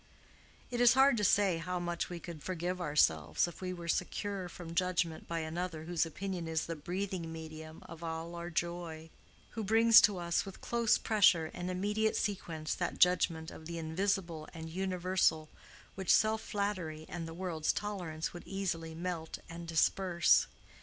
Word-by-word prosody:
It 240 0 -1
is 245 +1 +7
hard 270 0 +6
to 210 - 0
say 195 -3 +4
how 180 +2 -3
much 175 -1 -2
we 175 -1 -5
could 170 -3 -8
forgive 180 +2 -3
ourselves 80 - +2
if 175 - -10
we 185 -1 -3
were 175 -2 -7
secure 185 +2 -2
from 165 -1 -8
judgment 170 -2 0
by 165 -1 -2
another 160 0 -4
whose 165 0 0
opinion 180 0 -4
is 160 0 -1
the 165 - -4
breathing 175 +1 -4
medium 160 -1 -9
of 165 0 -10
all 165 +1 -4
our 170 0 -5
joy—who 170 +5 -5
brings 225 +2 +7
to 205 -2 +3
us 170 -1 0
with 195 - -9
close 235 -2 +2
pressure 195 -7 +4
and 180 0 -4
immediate 210 +4 0
sequence 165 -6 -2
that 175 - -2
judgment 165 -3 +3
of 160 - -10
the 170 0 -5
Invisible 165 -1 -1
and 160 0 -7
Universal 180 -3 +1 0.4
which 190 -2 -6
self 220 0 +4
flattery 185 -7 -3
and 165 -1 -5
the 165 - -8
world's 170 -4 -1
tolerance 180 -7 -4
would 175 - -10
easily 165 -5 -3
melt 170 -1 -4
and 170 0 -8
disperse. 170 +1 +3
175 Hz, 165 wpm, -33 LUFS, 160-190 Hz, 0.4 s, is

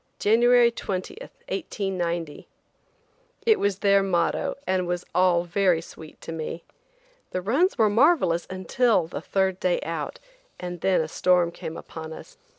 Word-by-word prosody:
January 240 +2 +4
20, 190 -5 -4 0.4
1890." 175 - -3 1.0
It 445 -2 +4
was 200 -2 0
their 200 -1 +4
motto 195 +9 0
and 185 -1 0
was 175 0 -3
all 180 -2 +3
very 180 -1 +2
sweet 160 -1 -12
to - - -7
me. 165 +1 -5 0.7
The 185 - -3
runs 280 - +2
were 220 -3 +4
marvelous 205 - +3
until 190 +1 +1
the 165 - -6
third 190 -1 0
day 180 -1 +1
out, 165 -2 -5 0.4
and 175 -1 -6
then 190 -3 +3
a 160 - -3
storm 175 +1 +2
came 165 -1 -7
upon 160 -1 -8
us. - - -12
185 Hz, 145 wpm, -25 LUFS, 170-205 Hz, 1.0 s, January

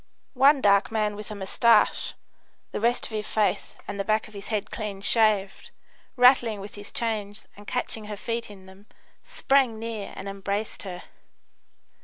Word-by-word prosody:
One 275 +1 +5
dark 200 -1 +4
man 210 -2 0
with 210 +1 -8
a 210 - -6
moustache, 205 +4 +3 0.6
the - - -4
rest 235 +2 +2
of - - -7
his 215 -1 -3
face 215 -2 0
and 200 - -5
the - - 0
back 215 +3 0
of 215 - -17
his 200 0 -9
head 210 -3 -3
clean 210 -3 -5
shaved, 205 -2 +2 0.5
rattling 245 -4 +5
with 200 +1 -9
his 205 0 -7
chains 215 -2 -3
and 205 0 -14
catching 225 -3 -2
her 210 -1 -6
feet 230 +2 -3
in 195 -2 -13
them, 190 +2 -16 0.4
sprang 275 - +1
near 225 -2 -5
and 190 - -7
embraced 200 +2 -3
her. 180 -3 -7
210 Hz, 170 wpm, -26 LUFS, 200-230 Hz, 0.6 s, One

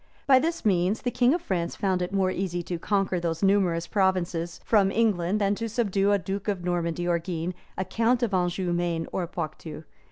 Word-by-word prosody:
By 265 -2 +6
this 330 -1 -2
means, 190 +1 +2
the 245 - 0
king 245 0 +3
of 350 - -4
France 175 - -2
found 190 -2 0
it 180 - -2
more 190 -1 +1
easy 175 -2 -2
to 175 0 -4
conquer 195 -1 0
those 165 +1 -2
numerous 190 -4 +2
provinces 185 -4 0
from 205 -4 +4
England 205 -3 +1
than 200 -1 +2
to 230 +2 -3
subdue 205 -3 +1
a 205 - +4
duke 195 +2 -5
of 195 -4 -1
Normandy 175 -1 -1
or 170 -1 +2
Guienne, 170 0 -4 0.2
a 190 - -1
count 230 +6 +1
of 220 -4 0
Anjou, 180 0 0
Maine, 170 -1 -1
or 180 -2 -2
Poietou. 155 -2 -6
185 Hz, 200 wpm, -26 LUFS, 175-205 Hz, 0.2 s, By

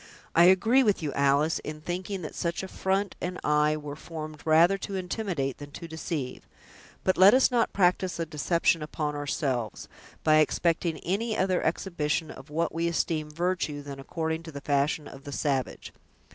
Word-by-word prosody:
"I 170 - +7
agree 220 +8 +5
with 205 -8 +2
you, 145 - -2
Alice, 140 +3 +2
in 155 0 -7
thinking 180 +3 -4
that 155 - -6
such 170 +2 -2
a - - -4
front 190 +1 -1
and 180 0 -3
eye 150 0 +3
were 145 -1 -7
formed 155 -1 -8
rather 165 +4 +5
to 195 - -5
intimidate 180 - -2
than 145 0 -8
to 170 - -7
deceive; 160 -4 -5 0.6
but 185 - +1
let 195 +5 +9
us 260 0 +4
not 240 -2 +2
practice 180 -1 +1
a 165 - 0
deception 165 +2 +1
upon 150 -1 -3
ourselves, 135 -5 -2 0.4
by 155 0 +5
expecting 165 +2 +1
any 215 +5 -1
other 185 -1 +1
exhibition 160 -2 -1
of 135 - -12
what 165 +3 -1
we 165 +1 0
esteem 160 -2 -1
virtue 160 -2 -2
than 140 -1 -8
according 160 +3 -3
to 165 -1 -9
the 140 - -7
fashion 145 +1 0
of 135 - -11
the 145 - -7
savage. 135 -4 -2
160 Hz, 175 wpm, -28 LUFS, 150-180 Hz, 0.6 s, let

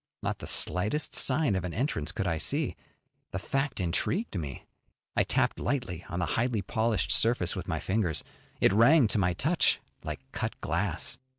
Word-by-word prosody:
Not - - -2
the - - -7
slightest 105 +12 +1
sign 135 -5 +3
of 95 - -1
an 90 -2 -4
entrance 95 - -1
could 95 - -3
I 85 -2 0
see. 140 - 0 0.5
The - - -4
fact 135 +7 -1
intrigued 95 - -1
me. 75 -7 -5 0.5
I - - +4
tapped - - +1
lightly 120 - -2
on 90 - -4
the 90 - +1
highly 115 -3 0
polished 110 -3 0
surface 115 -6 +3
with 90 -1 -5
my 80 -3 -1
fingers. 95 -4 -1 0.4
It - - +4
rang 125 +7 +6
to 105 - +1
my 90 -2 +2
touch 155 - +2 0.2
like 75 -3 -5
cut - - -4
glass. - - -1
100 Hz, 175 wpm, -29 LUFS, 90-130 Hz, 0.5 s, rang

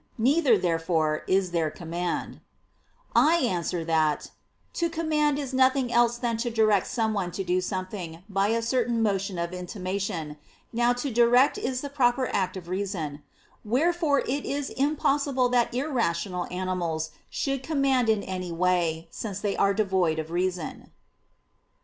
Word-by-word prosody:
Neither, 275 +6 +4
therefore, 165 -3 0
is 185 -1 +2
there 165 -2 +1
command. 170 +2 -4 0.8
I 320 +3 +6
answer 180 - -1
that, 160 -2 +1 0.4
To 340 -1 0
command 305 -3 +1
is 275 -3 -4
nothing 260 -1 +3
else 240 0 +3
than 235 -2 -1
to 240 +2 -1
direct 215 -4 +3
someone 215 -6 -1
to 195 - -3
do 180 0 +1
something, 185 -2 -5
by 195 -1 +1
a 230 +1 0
certain 235 -1 +1
motion 195 -3 0
of 170 +1 -3
intimation. 180 -3 -4 0.4
Now 240 +1 +3
to 245 +3 -3
direct 245 +3 +4
is 255 0 -2
the 285 - -5
proper 255 -2 +2
act 190 -1 0
of 175 -2 -9
reason. 175 -6 -3 0.4
Wherefore 300 +5 +2
it 280 +3 -2
is 285 0 -3
impossible 280 -2 +1
that 245 -1 +2
irrational 205 - -1
animals 175 -4 -2 0.2
should 275 -2 -2
command 270 -5 +1
in 215 -2 +2
any 185 -2 -4
way, 170 -2 0
since 205 -3 -5
they 205 -1 -1
are 200 0 +2
devoid 190 -6 +1
of 160 0 -4
reason. 180 -1 -2
205 Hz, 145 wpm, -26 LUFS, 180-255 Hz, 0.8 s, I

